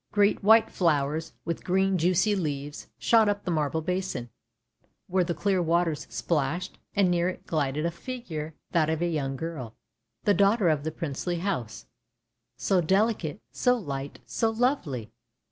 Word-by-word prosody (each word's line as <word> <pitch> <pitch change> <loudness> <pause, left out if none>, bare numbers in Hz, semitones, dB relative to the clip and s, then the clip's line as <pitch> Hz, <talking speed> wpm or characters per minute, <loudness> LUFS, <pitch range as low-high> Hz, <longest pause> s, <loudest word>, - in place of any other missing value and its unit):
Great 205 0 +3
white 220 +2 +6
flowers, 160 -1 0
with 170 - -3
green 190 +1 +2
juicy 185 +4 +3
leaves, 145 -5 -4
shot 225 -2 +4
up 205 0 -1
the 180 - -2
marble 155 0 0
basin, 180 - -2 0.7
where 185 0 +2
the 170 -1 -2
clear 190 +2 +1
waters 165 -3 +1
splashed, 150 +8 -1 0.2
and 195 -3 +4
near 175 0 +2
it 185 - -8
glided 150 -1 -1
a 170 - +1
figure, 170 -7 -6 0.2
that 160 -3 +2
of 160 -1 0
a - - +2
young 140 -5 -1
girl, 135 -7 -5 0.5
the 205 - +4
daughter 200 -1 +4
of 150 -2 +1
the 160 - -2
princely 165 +2 -3
house 165 - -3 0.4
— 115 - -55 0.3
so 190 -3 +2
delicate, 190 -1 +1
so 250 0 +2
light, 140 - -5
so 225 - 0
lovely! 220 - -1
170 Hz, 160 wpm, -27 LUFS, 150-195 Hz, 0.7 s, white